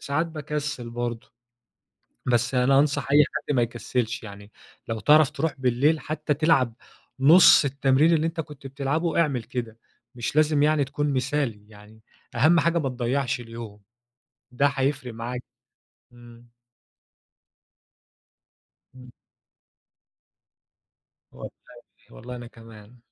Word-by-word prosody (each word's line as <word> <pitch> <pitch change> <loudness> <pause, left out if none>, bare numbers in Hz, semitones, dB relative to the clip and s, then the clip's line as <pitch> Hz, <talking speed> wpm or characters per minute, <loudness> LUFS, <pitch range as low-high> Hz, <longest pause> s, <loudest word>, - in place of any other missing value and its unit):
ساعات 145 +4 -1
باكسل 150 -5 -5
برضه. 120 -1 -5 0.9
بس 125 +1 0
أنا 135 +2 +4
أنصح 140 -1 0
أي 150 +1 +7
حد 145 -2 -2
ما 120 - +3
يكسلش، 120 0 -3
يعني 100 0 -11 0.4
لو 115 -1 -3
تعرف 150 +6 +5
تروح 155 +1 -2
بالليل 135 +5 +1
حتى 155 -1 -3
تلعب 140 -6 +2 0.5
نص 155 +2 +7
التمرين 140 +3 +2
اللي 160 0 +1
أنتَ 165 +1 -6
كنت 150 -3 -11
بتلعبه 145 +5 -1
إعمل 135 -7 -1
كده، 115 -2 -6 0.4
مش 120 +3 -4
لازم 155 -1 +3
يعني 150 -1 +2
تكون 145 +1 -2
مثالي، 130 -5 -2
يعني 105 +1 -17 0.3
أهم 160 +7 +4
حاجة 170 +1 +1
ما 135 - -2
تضّيعش 130 +2 -2
اليوم. 115 -3 -10 0.7
ده 125 +3 +1
هيفرق 135 -2 -2
معاك، 120 +2 -6 0.7
امم. 120 0 -16 2.5
امم. 125 -1 -13 2.2
والله - - -9 0.6
والله 125 +2 -9
أنا 120 0 -9
كمان، 115 0 -15
135 Hz, 115 wpm, -24 LUFS, 120-150 Hz, 2.5 s, أي